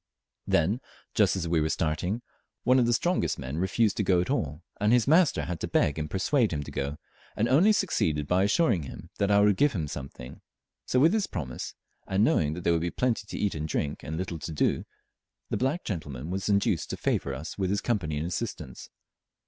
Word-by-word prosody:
Then, 95 Hz, +10 st, +2 dB, 0.3 s
just -, -, +3 dB
as 90 Hz, -3 st, -2 dB
we 80 Hz, -1 st, +2 dB
were 80 Hz, -, 0 dB
starting, 90 Hz, +10 st, -1 dB, 0.4 s
one 130 Hz, +1 st, +5 dB
of 120 Hz, -, +3 dB
the -, -, +3 dB
strongest 175 Hz, +9 st, +1 dB
men 65 Hz, +5 st, -4 dB
refused 100 Hz, +4 st, +1 dB
to 105 Hz, -, +1 dB
go 90 Hz, -2 st, +3 dB
at 90 Hz, -, -1 dB
all, 75 Hz, -, -2 dB, 0.2 s
and 105 Hz, +1 st, +3 dB
his 120 Hz, 0 st, +4 dB
master 165 Hz, +3 st, +4 dB
had 90 Hz, -2 st, -4 dB
to -, -, -3 dB
beg 75 Hz, +1 st, +1 dB
and 75 Hz, 0 st, -3 dB
persuade 115 Hz, +4 st, +1 dB
him 75 Hz, -3 st, -2 dB
to -, -, -9 dB
go, 70 Hz, +2 st, -3 dB, 0.4 s
and 110 Hz, -, +1 dB
only 160 Hz, -, +5 dB
succeeded 80 Hz, -, +1 dB
by 90 Hz, +3 st, +3 dB
assuring 105 Hz, -, +2 dB
him 70 Hz, -, -9 dB
that 100 Hz, -, +2 dB
I 100 Hz, 0 st, +5 dB
would 105 Hz, -2 st, +4 dB
give 145 Hz, 0 st, +3 dB
him 80 Hz, -7 st, -2 dB
something; 65 Hz, -3 st, -8 dB, 0.5 s
so 125 Hz, -, +2 dB
with 160 Hz, +5 st, +6 dB
this 215 Hz, -2 st, +1 dB
promise, 70 Hz, -9 st, -5 dB, 0.3 s
and 95 Hz, +2 st, +2 dB
knowing 75 Hz, -8 st, +2 dB
that 90 Hz, -, -6 dB
there 85 Hz, -, +3 dB
would 85 Hz, -, +1 dB
be 85 Hz, -, 0 dB
plenty 115 Hz, 0 st, -1 dB
to -, -, -6 dB
eat 105 Hz, -, 0 dB
and 75 Hz, 0 st, -3 dB
drink 75 Hz, -2 st, -2 dB
and 80 Hz, +1 st, -5 dB
little 85 Hz, -2 st, -4 dB
to 75 Hz, +2 st, -6 dB
do, 75 Hz, -, 0 dB, 0.7 s
the -, -, +1 dB
black 135 Hz, +8 st, 0 dB
gentleman 75 Hz, -, -5 dB
was 95 Hz, +2 st, -2 dB
induced 100 Hz, -1 st, +1 dB
to -, -, -4 dB
favour 70 Hz, -, -1 dB
us 80 Hz, +9 st, -7 dB
with 95 Hz, -2 st, 0 dB
his 100 Hz, +1 st, 0 dB
company 95 Hz, -11 st, -1 dB
and 75 Hz, -, -2 dB
assistance. 85 Hz, -, -5 dB
95 Hz, 220 wpm, -28 LUFS, 75-115 Hz, 0.7 s, with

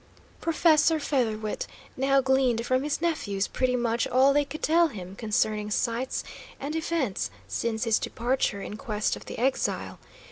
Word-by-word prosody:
Professor 325 Hz, -1 st, +4 dB
Featherwit 225 Hz, -7 st, -1 dB, 0.3 s
now 270 Hz, +1 st, +3 dB
gleaned 260 Hz, -3 st, +2 dB
from 255 Hz, +1 st, +2 dB
his 295 Hz, +2 st, -2 dB
nephews 205 Hz, -, 0 dB
pretty 255 Hz, -1 st, 0 dB
much 240 Hz, +1 st, 0 dB
all 265 Hz, +2 st, +4 dB
they 290 Hz, 0 st, +3 dB
could 300 Hz, +3 st, -8 dB
tell 335 Hz, +2 st, +4 dB
him 190 Hz, -, -8 dB
concerning 215 Hz, -1 st, 0 dB
sights 235 Hz, +4 st, -1 dB, 0.4 s
and 290 Hz, +3 st, -4 dB
events 320 Hz, -, -1 dB, 0.2 s
since 225 Hz, -1 st, -2 dB
his 225 Hz, -3 st, +2 dB
departure 235 Hz, -4 st, -1 dB
in 210 Hz, -, -6 dB
quest 215 Hz, -3 st, -1 dB
of -, -, -11 dB
the -, -, -7 dB
exile. 260 Hz, +3 st, -1 dB
255 Hz, 150 wpm, -27 LUFS, 220-280 Hz, 0.4 s, Professor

